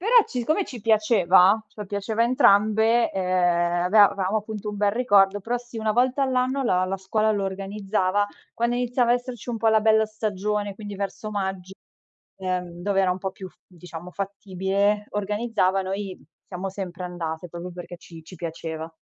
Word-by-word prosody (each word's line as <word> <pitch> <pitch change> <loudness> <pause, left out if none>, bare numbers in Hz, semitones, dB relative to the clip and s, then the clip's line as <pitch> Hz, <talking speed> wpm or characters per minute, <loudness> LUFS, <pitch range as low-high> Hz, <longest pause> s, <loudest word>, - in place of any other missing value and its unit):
però 445 +7 -1
c - - -20
siccome 310 - 0
ci 245 -4 -8
piaceva, 210 -3 +4
ce 210 - -14
lo 210 - -5
piaceva 205 +3 -1
entrambe, 225 -1 +4
eh - - -4
aveva 180 +2 +3
avevamo 195 +2 -1
appunto 215 0 -6
un 210 - -4
bel 205 0 +2
ricordo, 205 -4 +3
però 235 +5 -2
sì, 240 -1 -9
una 220 -1 0
volta 255 +4 +2
all'anno 260 +1 +1
la 185 -6 +2
la 190 +1 -2
scuola 215 +3 0
lo 200 -2 -1
organizzava. 195 0 -1 0.3
Quando 235 +1 0
iniziava 245 -1 +1
a - - +5
esserci 245 0 -6
un 240 - -2
po' 225 0 +2
la 220 0 +4
bella 220 0 +4
stagione, 210 -1 -3
quindi 205 -1 -8
verso 200 +2 -5
magg 190 -3 -3 0.7
ehm 180 -2 -4
dove 195 0 +1
era 190 -1 +2
un 180 - -1
po' 190 0 -3
più 190 0 -9
f - - -27
diciamo 175 -1 -10
fattibile, 200 +1 -1
organizzavano 200 -2 0
i 195 -1 -5 0.3
siamo 185 +2 -3
sempre 185 -2 -6
andate 170 -1 -5
proprio 175 +2 -7
perché 175 0 -9
ci 165 -1 -13
ci 175 - -13
piaceva. 160 -1 -6
200 Hz, 180 wpm, -24 LUFS, 185-220 Hz, 0.7 s, a